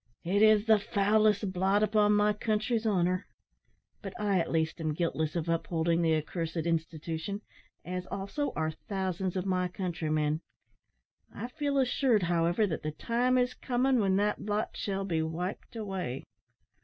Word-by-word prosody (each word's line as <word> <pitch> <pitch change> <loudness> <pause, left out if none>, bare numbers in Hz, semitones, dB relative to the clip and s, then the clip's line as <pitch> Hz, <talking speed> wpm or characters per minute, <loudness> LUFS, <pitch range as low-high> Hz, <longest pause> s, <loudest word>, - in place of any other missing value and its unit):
"It 195 +4 +1
is 215 -1 +6
the 220 -2 +5
foulest 205 0 +2
blot 195 +3 +2
upon 210 -1 +3
my 210 0 +3
country's 220 +2 0
honour; 185 -2 +1 0.7
but 195 -2 -8
I 200 -3 +2
at 165 - -1
least 160 0 0
am 155 -2 -1
guiltless 160 -2 -1
of 170 -1 -2
upholding 165 0 +1
the 160 -1 +3
accursed 165 +2 -3
institution, 165 +4 -2 0.4
as, 180 0 -4
also, 200 +10 -3
are 160 0 0
thousands 190 +1 -3
of 185 0 -1
my 185 -1 +1
countrymen. 160 -4 -1 0.9
I 240 - -6
feel 285 +1 -1
assured, 250 -5 +2
however, 175 +4 +2
that 165 -6 -3
the 155 - -2
time 245 +9 +1
is 250 0 +2
coming 255 0 +1
when 195 -3 +2
that 205 +1 0
blot 210 +1 -2
shall 195 -1 -2
be 165 -4 0
wiped 170 +8 -4
away." 190 - -4
190 Hz, 155 wpm, -30 LUFS, 165-210 Hz, 0.9 s, is